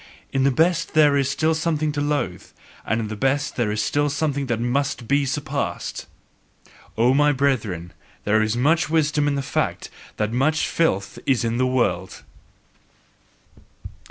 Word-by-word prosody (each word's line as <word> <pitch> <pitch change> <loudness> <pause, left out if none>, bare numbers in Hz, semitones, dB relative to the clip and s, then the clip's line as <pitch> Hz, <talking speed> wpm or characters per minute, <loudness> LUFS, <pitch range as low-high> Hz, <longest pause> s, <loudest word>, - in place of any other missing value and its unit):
In 135 0 +2
the - - +5
best 165 +5 +1
there 150 -2 +5
is 140 -1 +1
still 155 +3 +1
something 155 -1 0
to 145 -1 -3
loathe; 145 -11 -2 0.4
and 110 0 0
the 110 - -5
best 135 +4 -1
is 105 -2 0
still 145 +5 +1
something 145 -1 -1
that 120 -2 -1
must 120 0 -1
be 140 0 +2
surpassed! 140 - -3 0.9
O 120 +3 +4
my 145 +2 +4
brethren, 115 - -1 0.3
there 110 +1 +2
is 110 +2 0
much 155 +6 +2
wisdom 150 -2 +1
in 145 - +1
the 140 - -2
fact - - -2 0.3
that 105 +1 -1
much 150 +5 +1
filth 100 -12 0
is 130 -4 +2
in 115 +1 -1
the 130 - +2
world! 120 -8 -1
140 Hz, 155 wpm, -22 LUFS, 115-150 Hz, 0.9 s, the